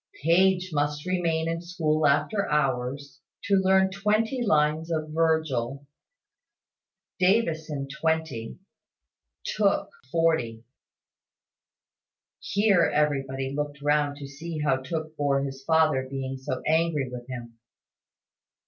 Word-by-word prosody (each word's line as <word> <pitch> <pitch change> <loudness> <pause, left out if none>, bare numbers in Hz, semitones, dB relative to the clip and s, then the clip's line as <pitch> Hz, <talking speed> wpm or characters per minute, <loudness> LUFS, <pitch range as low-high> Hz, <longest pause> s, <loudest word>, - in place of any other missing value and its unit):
Page 185 +2 +3
must 145 +1 -1
remain 170 -3 0
in 165 0 -2
school 160 -4 0
after 150 +9 +1
hours, 135 -1 -1 0.2
to 200 - -1
learn 190 0 +3
twenty 215 +5 0
lines 155 -3 +2
of 155 -2 -2
Virgil; 155 -5 0 1.3
Davison 160 -8 +1
twenty; 155 -5 -2 0.9
Tooke 205 -2 +1 0.2
forty 160 -10 +1 1.8
Here 195 -5 +3
everybody 135 -3 0
looked 145 -1 -3
round 145 -1 +1
to 140 -1 -8
see 155 +4 -7
how 150 -3 +2
Tooke 155 +3 -5
bore 140 -2 +1
his 135 -1 -6
father 155 -4 +2
being 135 -1 -4
so 130 0 -4
angry 160 -3 +1
with 125 -1 -8
him. 120 -3 -8
150 Hz, 105 wpm, -26 LUFS, 135-165 Hz, 1.8 s, Page